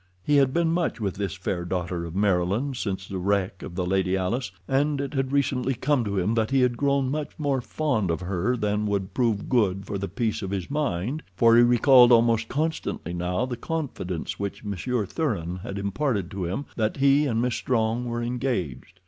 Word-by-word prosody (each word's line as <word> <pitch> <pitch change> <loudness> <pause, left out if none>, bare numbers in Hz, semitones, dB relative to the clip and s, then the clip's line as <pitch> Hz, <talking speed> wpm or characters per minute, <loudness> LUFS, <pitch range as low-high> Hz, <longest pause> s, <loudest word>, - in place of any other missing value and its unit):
He 145 +5 +3
had 135 -2 +4
been 170 +2 +1
much 170 -6 0
with 100 -4 -1
this 100 -4 -3
fair 85 -2 -3
daughter 90 -1 -3
of 85 +1 -7
Maryland 100 +7 +1
since 95 -5 -3
the 95 - -4
wreck 95 0 0
of 85 - -8
the 90 -1 -1
Lady 95 0 +1
Alice, 105 +6 -2 0.2
and 140 +2 +1
it 140 0 -3
had 135 -1 -1
recently 135 -2 +1
come 130 +1 +1
to 100 -1 -2
him 95 +4 +1
that 110 -1 +1
he 135 -1 +3
had 125 -1 +2
grown 140 0 +1
much 150 0 -4
more 140 -4 0
fond 120 - -1
of 80 - 0
her 95 +7 -1
than 105 -1 0
would 100 -2 -2
prove 115 -5 0
good 100 -6 +1
for 100 - -4
the 100 - -3
peace 110 +3 -2
of 95 - -4
his 95 +3 -4
mind, 140 - -1
for 115 +3 +5
he 120 - +7
recalled 125 +1 +6
almost 115 -1 +4
constantly 155 - -2
now 90 +6 -1
the 125 -1 -4
confidence 120 - -4
which 100 +1 -4
Monsieur 105 +3 -2
Thuran 95 - -2
had 95 +2 -6
imparted 100 - -1
to 95 -2 -3
him 95 +12 -3
that 110 +1 -1
he 140 +2 +4
and 115 -4 0
Miss 125 +1 +1
Strong 115 -1 0
were 120 0 -2
engaged. 120 - -3
115 Hz, 205 wpm, -25 LUFS, 95-135 Hz, 0.2 s, he